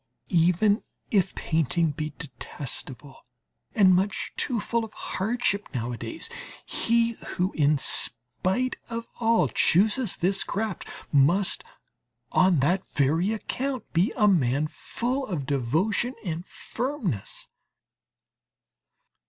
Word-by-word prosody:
Even 180 +6 +4 0.3
if 195 -3 +2
painting 160 0 +1
be 155 +1 -4
detestable 135 -2 -7 0.5
and 190 -3 +6
much 190 +2 0
too 245 -5 0
full 235 +2 -1
of 220 - -8
hardships 210 0 -1
nowadays, 125 - -4 0.4
he 235 0 +2 0.3
who 185 +2 +1
in 150 0 +3
spite 135 - +1
of 230 0 -4
all 225 -8 +3
chooses 210 - +2
this 195 +2 +1
craft 215 -3 -3 0.2
must 170 +8 +3 0.7
on 180 -6 +4
that 180 +7 +2
very 160 +8 +1
account 255 +3 -3
be 180 +8 +3
a 210 -3 +5
man 145 -6 +3
full 250 - -2
of 160 -9 -3
devotion 160 - 0
and 170 +1 -4
firmness. 240 - -4
185 Hz, 105 wpm, -26 LUFS, 150-220 Hz, 0.7 s, and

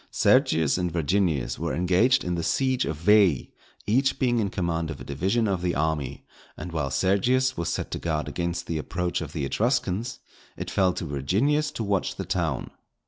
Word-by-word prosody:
Sergius 80 +1 +3
and 90 -1 -1
Virginius 85 -3 0
were - - -2
engaged 90 - +3
in 90 - -2
the 85 - -1
siege 130 +7 +1
of 80 - -3
Veii, 95 -4 +4 0.3
each 130 +6 +2
being 120 -3 +1
in 100 -3 0
command 85 -3 -2
of - - -6
a - - -8
division 95 - 0
of 95 -3 -1
the 90 -1 -1
army, 75 -3 -2 0.3
and 90 - -6
while 75 -4 -2
Sergius 100 - +2
was 85 - -2
set - - -3
to - - -3
guard 80 -2 -2
against 85 0 -3
the 80 -2 -2
approach 90 +3 -2
of 75 -3 -6
the 75 -4 -3
Etruscans, 115 - -1 0.4
it - - -5
fell 95 -1 +3
to - - -4
Virginius 105 - +1
to 120 - -5
watch 100 -3 -1
the - - -5
town. - - -2
90 Hz, 190 wpm, -26 LUFS, 80-110 Hz, 0.4 s, Veii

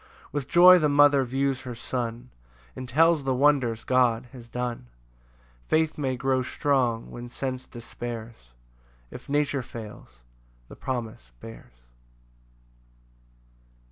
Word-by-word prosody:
7 - - -21
With 145 -3 -3
joy 180 +1 +8
the 150 -2 +2
mother 145 -1 +5
views 135 +1 -1
her 125 -2 -7
son, 120 0 -5 0.4
And 130 -1 -7
tells 160 +2 +3
the 135 -1 0
wonders 130 -5 +2
God 125 -2 +1
has 120 -3 -12
done: 120 - -4 0.8
Faith 160 0 +1
may 135 -3 -2
grow 130 0 +1
strong 125 -3 0
when 120 0 -8
sense 130 +1 -5
despairs, 115 - -9 0.6
If - - -11
nature 145 -1 0
fails, 105 - -11 0.5
the - - -11
promise 115 - -5
bears. 115 - -12
130 Hz, 120 wpm, -26 LUFS, 115-140 Hz, 0.8 s, joy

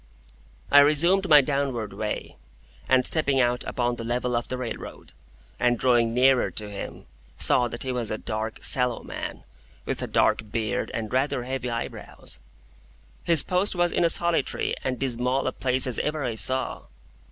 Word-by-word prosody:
I 145 - +8
resumed 170 +7 +3
my 150 -2 +8
downward 135 -6 -2
way, - - -4 0.5
and 130 -1 +4
stepping 140 -4 +2
out 125 -1 +1
upon 120 -1 -1
the 115 - -6
level 125 +1 -1
of 120 - -2
the 130 - -4
railroad, 125 -2 -7 0.5
and 120 -1 +2
drawing 120 -2 +2
nearer 130 +2 +3
to 105 -1 -5
him, 100 - -8 0.3
saw 125 -1 +4
that 120 0 -6
he 130 - -3
was 120 -3 -2
a 110 - -2
dark, 110 0 -5
sallow 125 -2 +2
man, - - -7 0.4
with - - -2
a - - -3
dark 110 -2 +1
beard 115 +2 -2
and 110 -1 -4
rather 130 -1 0
heavy 130 0 -4
eyebrows. 115 - -6 0.9
His 165 -4 +5
post 185 +2 0
was 175 -1 +2
in - - +1
as 170 - +4
solitary 170 -5 0
and 130 -1 -2
dismal 125 0 0
a 130 - 0
place 130 0 0
as 125 -3 0
ever 150 -1 -2
I 120 -3 -2
saw. 130 +4 0
125 Hz, 170 wpm, -25 LUFS, 120-140 Hz, 0.9 s, I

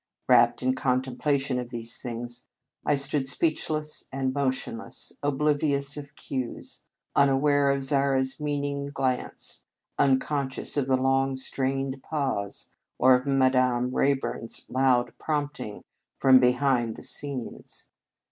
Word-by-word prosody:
Wrapped 120 -1 +5
in 130 - +3
the - - -2
con 130 -1 +1
templation 135 0 -1
of 125 -1 -5
these 115 -1 -3
things, 120 0 -6 0.4
I 145 - +2
stood 140 0 -1
speechless 155 +1 -1
and 130 -1 -1
motionless, 130 -4 -3
oblivious 145 -1 +1
of 145 -1 -9
cues, 130 -3 -6 0.3
unaware 140 +1 +4
of 140 0 +1
Zara 135 -1 +2
s 130 +2 -4
meaning 145 -1 -2
glance, 130 -3 -3 0.4
unconscious 135 0 +1
of 140 -3 0
the 130 -1 +3
long, 135 +1 +1
strained 135 0 -2
pause, 135 -11 -3 0.3
or 130 +1 +6
of 125 +2 +1
Madame 130 -2 +2
Ray 140 0 +3
burn 135 - -5
s - - -5
loud 130 -1 +2
prompting 145 -8 -3 0.3
from 130 -1 +7
behind 125 -2 +2
the - - -10
scenes. 140 -5 -5
135 Hz, 130 wpm, -27 LUFS, 130-140 Hz, 0.4 s, from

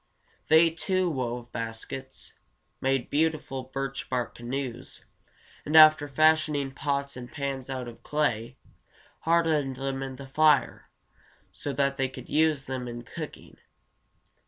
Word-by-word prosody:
They, 160 +1 +6
too, 185 +2 0
wove 120 -3 -4
baskets, 115 +4 -6 0.5
made 135 -2 0
beautiful 150 -4 0
birch 135 +1 -5
bark 125 -2 -2
canoes, 125 +1 -5 0.6
and 150 - -2
after 155 -1 +8
fashioning 150 -1 +2
pots 140 0 -2
and 125 -1 -9
pans 135 -3 -4
out 130 -2 -4
of 120 - -11
clay, 130 -5 -1 0.6
hardened 160 -5 +2
them 135 0 -3
in 135 -1 -5
the 140 +1 -9
fire, 150 +2 +2 0.6
so 145 - -5
that 140 0 +1
they 135 -1 0
could 130 - -11
use 155 -2 +2
them 130 -2 -4
in 120 0 -6
cooking. - - -9
135 Hz, 130 wpm, -27 LUFS, 130-155 Hz, 0.6 s, after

